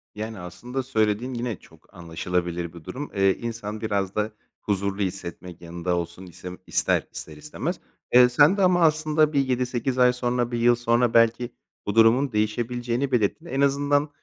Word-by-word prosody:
Yani, 110 0 -5
aslında 105 +10 -5
söylediğin, 115 0 0
yine 120 -3 -3
çok 80 +4 -21
anlaşılabilir 85 0 -3
bir 85 -2 -12
durum, 140 - -6
eee, 95 -1 +3
insan 110 -2 -5
biraz 100 -3 -1
da 105 +1 -1 0.3
huzurlu 100 0 -1
hissetmek, 90 -2 -5
yanında 85 +1 -3
olsun 85 +2 -5
isem 90 0 -9
ister, - - +1
ister 75 -1 -8
istemez. 75 - -4 0.3
Eee, 125 0 +8
sen 145 +9 +5
de - - +1
ama 180 -1 +4
aslında 155 -1 +3
bir 140 - +3
7-8 125 -1 -1
ay 125 -1 +5
sonra, 125 -1 -1
1 120 - -1
yıl 120 +1 +5
sonra 120 0 +1
belki 115 +1 +3 0.4
bu 100 - -2
durumun 115 +5 +5
değişebileceğini 120 +4 -1
belirttin, 125 - 0
en 140 -5 -2
azından, 145 +1 +2
115 Hz, 165 wpm, -24 LUFS, 95-125 Hz, 0.4 s, Eee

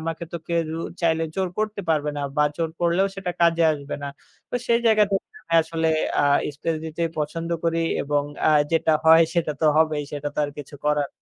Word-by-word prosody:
আমাকে 165 +1 -4
তো 170 - -2
কেউ 170 -1 0 0.3
চাইলে 165 -1 +2
জোর 190 -1 0
করতে 215 -1 -1
পারবে 150 -2 +1
না - - -2 0.2
বা 150 - +4
জোর 165 -1 -1
করলেও 175 +3 +2
সেটা 190 -2 -3
কাজে 170 0 +4
আসবে 145 -1 -6
না। 140 - -3 0.4
তো - - -5
সেই 235 0 +3
জায়গা 215 -1 +5
থেকে 195 - -1 0.2
আমি 165 - -3
আসলে 165 0 -2 0.3
আ - - +2 0.3
স্পেস 160 +2 -2
দিতেই 165 +1 -2
পছন্দ 165 +3 -3
করি 165 0 +1 0.2
এবং 145 0 0 0.3
আ - - +5 0.2
যেটা 160 0 +3
হয় 160 +1 +8
সেটা 165 -3 +1
তো 160 - +3
হবেই 155 -2 +2
সেটা 145 0 -3
তো - - -7
আর 145 - -4
কিছু 145 0 -9
করার 150 -1 +1
165 Hz, 205 wpm, -23 LUFS, 150-170 Hz, 0.4 s, হয়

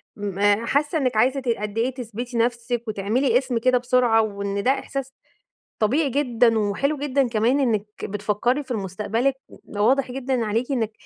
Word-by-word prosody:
م 200 -2 -5 0.3
حاسة 295 +5 +1
إنِّك 255 -6 0
عايزة 260 +4 +3
ت 255 - -9
قد 210 -2 -2
إيه 245 +3 +1
تثبتي 240 0 -6
نفسِك 235 0 -1
وتعملي 225 +5 +1
اسم 255 -2 -1
كده 255 +2 +3
بسرعة، 245 -2 +3
وإن 200 -1 -3
ده 260 - +4
إحساس 270 -1 -4 0.7
طبيعي 270 +7 +2
جدًا، 240 -4 +2
وحلو 220 +9 0
جدًا 275 -2 +1
كمان 235 +5 +2
إنِّك 220 -5 +1 0.2
بتفكري 210 +7 -1
في 265 - -19
ال 240 - 0
مستقبلِك. 215 +7 -1
و - - -15 0.2
واضح 260 +3 +2
جدًا 260 -2 -1
عليكِ 230 +6 -1
إنِّك 225 -4 -1
240 Hz, 170 wpm, -23 LUFS, 215-265 Hz, 0.7 s, ده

